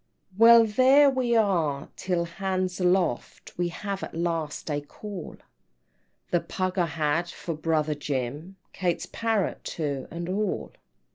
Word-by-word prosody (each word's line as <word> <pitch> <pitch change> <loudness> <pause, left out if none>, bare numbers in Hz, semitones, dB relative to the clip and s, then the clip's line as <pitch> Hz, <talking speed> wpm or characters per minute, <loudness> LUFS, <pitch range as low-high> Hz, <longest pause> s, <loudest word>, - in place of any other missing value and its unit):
VIII. 185 - -23
"Well, 230 0 +9
there 260 +6 +5
we 250 -3 +1
are 165 -10 +1
till 180 -2 -1
'hands 185 +1 -2
aloft,' 180 -8 0
We 175 0 0
have 195 +3 -5
at - - -7
last 165 -2 -2
a 145 0 -1
call; 190 +5 -8 0.9
The 175 - +3
pug 185 0 -2
I 175 - +2
had 160 +2 0
for 170 - -5
brother 155 -1 0
Jim, 145 +5 -4 0.2
Kate's 175 -3 -1
parrot 225 -4 -1
too, 145 -4 -3
and 170 0 -5
all." 205 +3 -2
175 Hz, 140 wpm, -26 LUFS, 155-200 Hz, 0.9 s, Well